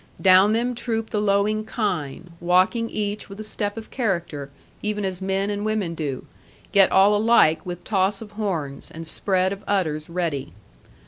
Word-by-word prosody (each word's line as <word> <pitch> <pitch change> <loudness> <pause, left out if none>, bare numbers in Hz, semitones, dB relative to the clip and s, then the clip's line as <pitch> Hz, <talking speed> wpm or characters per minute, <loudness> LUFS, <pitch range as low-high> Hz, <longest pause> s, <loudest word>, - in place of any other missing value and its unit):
Down 190 +2 +6
them 240 +2 0
troop 225 -2 -3
the 210 - 0
lowing 210 +1 +1
kine, 180 - -3
walking 185 +6 +2
each 205 0 -3
with 195 +1 -10
a - - -4
step 210 0 -2
of 220 - -8
character 170 - -2 0.3
(even 210 -1 -2
as 190 -1 -4
men 195 +1 -1
and 205 0 -3
women 215 -5 -1
do), 145 -5 -4 0.5
yet 195 -2 +6
all 195 +2 +5
alike 205 -8 +4
with 175 -1 -6
toss 195 -1 +1
of 215 -2 -10
horns, 170 -10 -4
and 165 +1 -8
spread 185 +3 +1
of 200 - -10
udders 160 -6 -1
ready. 165 - -3
195 Hz, 170 wpm, -23 LUFS, 175-210 Hz, 0.5 s, Down